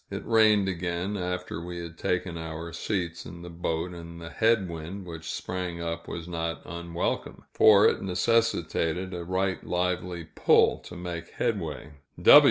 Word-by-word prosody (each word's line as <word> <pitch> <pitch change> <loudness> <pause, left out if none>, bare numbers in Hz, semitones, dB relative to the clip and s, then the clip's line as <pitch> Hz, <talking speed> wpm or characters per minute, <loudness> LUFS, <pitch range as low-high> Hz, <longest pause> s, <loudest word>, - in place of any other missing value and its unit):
It - - -5
rained 110 -3 +5
again, 90 +2 -2
after 90 -2 -3
we 90 0 -6
had 85 -1 -7
taken 90 0 -1
our 80 0 -6
seats 85 -1 -2
in 85 -1 -9
the 90 - -8
boat, 85 +1 -2
and 85 -1 -9
the 85 0 -8
head 110 -3 +3
wind 85 +4 -6
which 80 -2 -6
sprang 90 -2 -4
up 85 0 -4
was 85 0 -5
not 85 -3 -3
unwelcome, 85 0 -3
for 105 -2 +7
it - - +1
necessitated 95 -3 +1
a 90 -1 -4
right 95 +2 -1
lively 90 -1 -1
pull 80 - +4
to - - -9
make 90 -1 -5
headway. 85 -10 -2
85 Hz, 155 wpm, -28 LUFS, 85-95 Hz, -, for